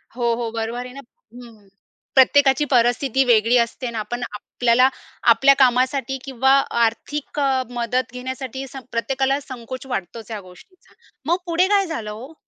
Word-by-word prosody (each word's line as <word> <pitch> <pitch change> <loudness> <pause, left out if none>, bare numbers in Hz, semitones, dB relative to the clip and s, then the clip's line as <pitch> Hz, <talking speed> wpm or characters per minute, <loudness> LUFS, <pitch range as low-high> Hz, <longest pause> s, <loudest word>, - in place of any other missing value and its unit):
हो, 235 -2 +1
हो, 230 -1 -4
बरोबर 230 +2 -4
आहे 250 - -10
ना 275 - -9 0.4
हं, 230 -5 -14 0.5
प्रत्येकाची 270 +1 +5
परिस्थिती 245 +2 +2
वेगळी 235 0 +4
असते 250 +2 -8
अन् 235 - -6
आपण 240 +3 -4
आपल्याला 240 +4 +2 0.4
आपल्या 270 +5 +5
कामासाठी 260 +1 +2
किंवा 265 0 +1 0.3
आर्थिक 290 +6 -3
अ, 270 -2 +1
मदत 245 0 -2
घेण्यासाठी 260 +1 -6
स 275 - -15 0.2
प्रत्येकाला 270 +3 0
संकोच 255 0 -8
वाटतोच 225 +4 -7
ह्या 215 - -4
गोष्टीचा. 365 - -20 0.3
मग 340 +4 +2
पुढे 345 +2 +2
काय 400 -1 +3
झालं 225 -10 -5
हो? 250 +9 -10
250 Hz, 150 wpm, -21 LUFS, 230-270 Hz, 0.5 s, प्रत्येकाची